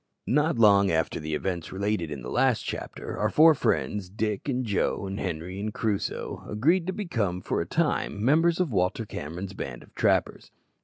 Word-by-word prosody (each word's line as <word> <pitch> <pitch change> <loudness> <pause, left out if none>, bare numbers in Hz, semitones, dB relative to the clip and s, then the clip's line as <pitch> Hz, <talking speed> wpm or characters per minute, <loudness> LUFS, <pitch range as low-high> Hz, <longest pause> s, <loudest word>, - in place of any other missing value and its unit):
Not 150 +2 +2
long 100 -3 +6
after 80 0 0
the 75 0 -3
events 85 0 -3
related 100 -3 -1
in 70 -5 -6
the 60 - -6
last - - +2
chapter, - - -6
our - - +2
four 160 +1 +7
friends 105 -8 -1
Dick, 105 +4 -2
and 130 -1 0
Joe, 100 -1 0
and 95 +1 -4
Henri, 90 +1 -4
and 105 +1 -2
Crusoe 105 -2 -2
agreed 165 - +2
to - - +1
become 115 - -2
for 90 - -1
a 85 - -4
time 130 - 0
members 165 +5 +4
of 180 -7 +1
Walter 95 +3 0
Cameron's 90 +2 -6
band 60 -9 -6
of - - -21
trappers. - - +1
100 Hz, 185 wpm, -27 LUFS, 90-130 Hz, -, four